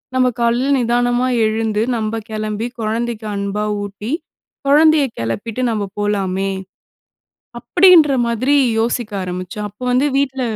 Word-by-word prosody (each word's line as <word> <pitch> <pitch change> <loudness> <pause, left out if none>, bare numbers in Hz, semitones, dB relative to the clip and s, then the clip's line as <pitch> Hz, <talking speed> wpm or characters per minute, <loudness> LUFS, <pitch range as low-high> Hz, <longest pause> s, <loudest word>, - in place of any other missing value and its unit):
நம்ம 255 -1 +3
காலையில 240 +3 +1
நிதானமா 245 +1 +1 0.2
எழுந்து, 215 -1 -1 0.2
நம்ம 220 0 -2
கெளம்பி, 215 +1 -3
கொழந்தைக்கு 225 0 -2
அன்பா 200 +1 -2 0.2
ஊட்டி, 205 +3 -6 0.6
கொழந்தய 305 +1 +5
கெளப்பிட்டு 205 - -3
நம்ம 215 -2 -1 0.2
போலாமே." 195 -2 -1 1.1
அப்படின்ற 355 -5 +5 0.2
மாதிரி 255 +5 +1 0.2
யோசிக்க 230 0 -1
ஆரம்பிச்சோம். 185 +4 -5
அப்ப 205 +4 -28
வந்து 255 +3 +3
வீட்ல 270 -1 0
225 Hz, 115 wpm, -18 LUFS, 210-255 Hz, 1.1 s, கொழந்தய